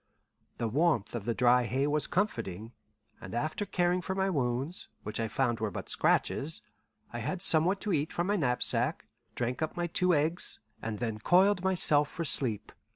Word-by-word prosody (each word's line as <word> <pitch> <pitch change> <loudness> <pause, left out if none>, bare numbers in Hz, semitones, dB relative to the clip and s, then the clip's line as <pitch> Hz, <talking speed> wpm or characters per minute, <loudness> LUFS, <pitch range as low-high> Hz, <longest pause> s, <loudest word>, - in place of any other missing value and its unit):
The 115 - -1
warmth 140 - +1
of 115 -4 -4
the 115 -1 -1
dry 125 0 +4
hay 130 +4 0
was 150 +1 0
comforting, 115 - -2 0.5
and - - -7
after 155 - -2
caring 180 -1 +1
for 190 +2 -4
my 190 0 +1
wounds, 135 +2 -2 0.2
which 105 +1 -5
I 115 - 0
found 120 0 0
were 110 -1 -1
but - - -7
scratches, - - +1 0.5
I 120 - -4
had 175 +11 -3
somewhat 170 +4 +4
to 210 - -1
eat 150 0 0
from 175 - -1
my 205 +2 +1
knapsack, 125 -9 0 0.3
drank 125 +3 -2
up 160 +2 -3 0.2
two 180 -2 +3
eggs, 155 +4 -1 0.2
and 110 -1 -4
then 110 -2 -3
coiled 185 - +4
myself 155 -6 +3
for 165 - -4
sleep. 120 -8 +2
145 Hz, 175 wpm, -30 LUFS, 120-175 Hz, 0.5 s, dry